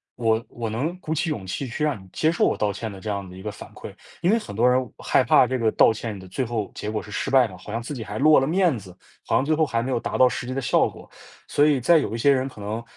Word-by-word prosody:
我 115 -1 +1
我 115 -1 -5
能 150 +12 -3
鼓 160 -3 -3
起 160 +1 -1
勇 105 -10 -4
气 125 +8 -4
去 125 +6 -4
让 145 -10 -1
你 - - -17
接 160 +1 +1
受 170 - 0
我 - - +2
道 105 -1 0
歉 110 +2 -5
的 95 - -10
这 110 - -9
样 100 -2 -3
的 90 - -11
一 95 - -10
个 105 - -4
反 - - -12
馈。 - - -9 0.3
因 180 - +3
为 230 - +3
很 100 - -9
多 120 +4 +3
人 125 -2 +1
害 - - +2
怕 - - +5
这 130 -1 -2
个 110 -1 +2
道 110 - +5
歉 110 -2 -5
的 95 0 -11
最 130 +8 -2
后 115 -4 -3
结 105 - -5
果 110 0 -3
是 105 - -12
失 - - -2
败 130 -3 +5
的， 95 - -11
好 90 +3 -11
像 115 - -2
自 145 - -6
己 120 -4 -5
还 105 +1 -6
落 155 +2 +6
了 135 - 0
面 175 -2 +2
子， 90 -2 -14 0.3
好 - - +1
像 135 - +2
最 155 - +2
后 155 +1 +2
还 115 -5 0
没 130 - -3
有 120 - +1
达 - - -3
到 130 - +6
实 125 - -4
际 130 - -4
的 135 - -1
效 120 - +2
果， - - -14 0.4
所 145 +1 +3
以 145 -3 +3
在 160 +6 +5
有 115 - -3
一 - - -2
些 140 +5 +4
人 130 0 -1
可 110 - -14
能 110 +3 -4
120 Hz, 345 characters per minute, -24 LUFS, 105-140 Hz, 0.4 s, 落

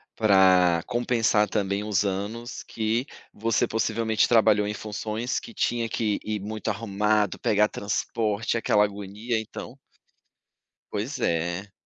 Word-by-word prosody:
pra 95 -5 +4
compensar, 115 -4 +1
também, 100 -1 -1
os 105 -1 +1
anos 105 +5 -4
que 115 +4 -2 0.3
você 115 +2 +1
possivelmente 110 0 +1
trabalhou 110 -3 +4
em 105 - -2
funções 110 +3 -3
que 230 - -11
tinha 120 -8 0
que 105 -2 -1
ir 105 -1 -2
muito 105 +1 -6
arrumado, 105 0 0
pegar 105 0 +3
transporte, 105 +2 -2
aquela 105 -2 +3
agonia, 105 +3 -3
então 110 - -8 1.2
Pois 110 +8 -3
é. 85 +4 -1
105 Hz, 120 wpm, -26 LUFS, 100-115 Hz, 1.2 s, pra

